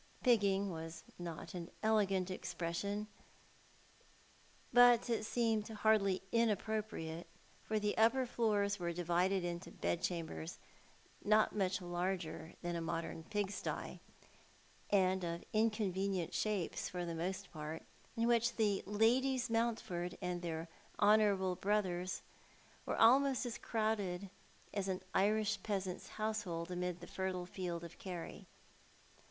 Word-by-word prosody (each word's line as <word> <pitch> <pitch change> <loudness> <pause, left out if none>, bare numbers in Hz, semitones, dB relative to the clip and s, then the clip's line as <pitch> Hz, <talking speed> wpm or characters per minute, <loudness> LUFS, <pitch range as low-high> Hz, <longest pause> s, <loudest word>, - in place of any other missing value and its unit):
Pigging 200 -5 +3
was 165 0 -6 0.2
not 170 -2 -6
an 175 -1 -5
elegant 195 -4 +2
expression, 185 +4 -3 1.7
but 245 -1 +7
it 220 -2 0
seemed 225 -2 +1
hardly 210 -3 +2
inappropriate, 215 -7 0 0.4
for 220 - -1
the 210 0 0
upper 255 +4 +5
floors 210 -4 +1
were 170 -1 -1
divided 175 +2 +1
into 175 0 -4
bed 175 - -1
chambers 160 - -3 0.7
not 215 +1 +4
much 185 -2 0
larger 175 -2 -3
than 175 0 -1
a 170 - -2
modern 165 0 -3
pigsty, 205 -1 -3 0.9
and 190 -2 +3
of 170 0 -3
inconvenient 200 -5 +1
shapes 205 -6 -1
for 180 -1 -3
the 170 - -3
most 185 +3 -3
part, 155 0 -5 0.3
in 230 - +2
which 235 0 +3
the 210 -3 +2
Ladies 245 +4 +2
Mountford 220 -7 -1
and 180 -2 -2
their 165 -1 -3 0.3
honourable 205 -3 +4
brotliers 185 -3 0 0.6
were - - -1
almost 265 +3 +5
as 240 -1 -4
crowded 205 -4 -1 0.4
as 200 -2 -1
an 185 0 -2
Irish 210 +1 +2
peasant's 195 -3 -3
household 205 -6 -2
amid 180 -1 -2
the - - -7
fertile 185 -1 -3
fields 175 -2 -4
of 170 - -11
Kerry. 180 -3 -6
195 Hz, 120 wpm, -36 LUFS, 175-215 Hz, 1.7 s, but